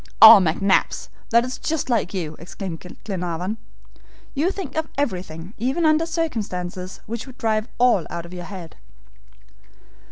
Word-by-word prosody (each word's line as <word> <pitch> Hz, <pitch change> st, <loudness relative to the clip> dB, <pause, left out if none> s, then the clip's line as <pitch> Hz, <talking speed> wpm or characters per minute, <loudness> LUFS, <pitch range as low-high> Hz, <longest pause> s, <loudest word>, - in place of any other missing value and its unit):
"Oh, 220 Hz, -1 st, +12 dB
McNabbs, 190 Hz, +3 st, +1 dB, 0.2 s
that's 240 Hz, +2 st, +2 dB
just 320 Hz, -2 st, -1 dB
like 230 Hz, -8 st, +1 dB
you," 165 Hz, -6 st, -3 dB
exclaimed 175 Hz, 0 st, -6 dB, 0.2 s
Glenarvan, 180 Hz, +1 st, -3 dB, 0.8 s
"you 305 Hz, +6 st, +1 dB
think 385 Hz, -7 st, -5 dB
of 315 Hz, 0 st, 0 dB
everything 185 Hz, -, -3 dB
even 265 Hz, +9 st, +1 dB
under 310 Hz, +1 st, +4 dB
circumstances 195 Hz, -, -3 dB
which 230 Hz, +4 st, -5 dB
would 260 Hz, -1 st, -12 dB
drive 220 Hz, 0 st, 0 dB
all 240 Hz, -8 st, +4 dB
out 170 Hz, 0 st, -5 dB
of 170 Hz, -, -11 dB
your 180 Hz, -1 st, -6 dB
head." 185 Hz, -5 st, -9 dB
210 Hz, 135 wpm, -23 LUFS, 180-260 Hz, 0.8 s, Oh